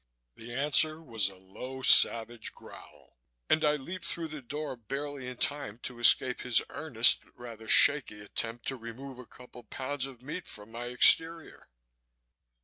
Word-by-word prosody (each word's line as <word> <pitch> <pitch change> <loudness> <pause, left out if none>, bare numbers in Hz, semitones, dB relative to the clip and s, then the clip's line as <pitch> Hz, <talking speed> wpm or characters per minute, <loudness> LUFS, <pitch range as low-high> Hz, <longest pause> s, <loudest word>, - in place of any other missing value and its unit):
The 115 +1 -12
answer 150 +4 +2
was 115 -10 -1
a 95 - -15
low 125 +8 -11
savage 115 -1 +3
growl - - -17 0.3
and 155 - +2
I 150 -1 +2
leaped 175 +6 -9
through 165 -1 -5
the 155 -2 -9
door 145 +2 -7
barely 135 +3 -7
in 125 -1 -8
time 140 -7 -2
to 125 -2 -6
escape 125 +1 +4
his 125 -2 +4
earnest 130 -6 +2
but - - -29
rather 115 -2 -11
shaky 140 -7 +5
attempt 115 +3 -4
to 135 - -6
remove 125 +3 -11
a 125 - -13
couple 125 -1 -15
of 110 - -36
pounds 135 0 -5
of 125 -2 -15
meat 160 +5 -8
from 105 +1 -11
my 120 +1 -8
exterior. 160 +6 +2
125 Hz, 165 wpm, -28 LUFS, 115-145 Hz, 0.3 s, shaky